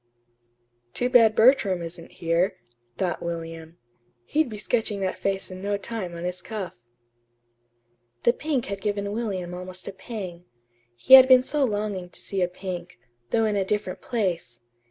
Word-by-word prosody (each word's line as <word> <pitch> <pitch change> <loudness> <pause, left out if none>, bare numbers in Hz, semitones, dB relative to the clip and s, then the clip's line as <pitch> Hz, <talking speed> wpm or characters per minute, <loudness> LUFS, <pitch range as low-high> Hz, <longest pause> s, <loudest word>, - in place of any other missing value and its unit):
"Too 245 - 0
bad 225 -4 +6
Bertram 220 -7 +4
isn't 170 0 -9
here," 175 +3 0 0.4
thought 185 -2 -1
William. 165 -1 -6 0.5
"He'd 310 - +1
be 215 - -6
sketching 215 -1 -1
that 190 -1 -2
face 195 -1 -2
in 185 0 -8
no 200 +1 -1
time 200 -4 -5
on 170 - -6
his 180 +1 -3
cuff." 205 -3 -5 1.5
The 235 - +5
pink 285 -3 -1
had 200 -1 -5
given 200 0 -2
William 195 -6 -3
almost 185 +1 -7
a 200 - -5
pang. 190 -5 -7 0.5
He 120 - +2
had 260 -1 +12
been 255 -1 +7
so 295 +2 0
longing 205 -6 -2
to - - -7
see 195 -2 -2
a 180 - +3
pink 180 -1 -7 0.3
though 225 -1 +2
in 210 -1 +1
a 200 - +2
different 205 -1 -2
place. 180 - -2
195 Hz, 160 wpm, -25 LUFS, 180-220 Hz, 1.5 s, had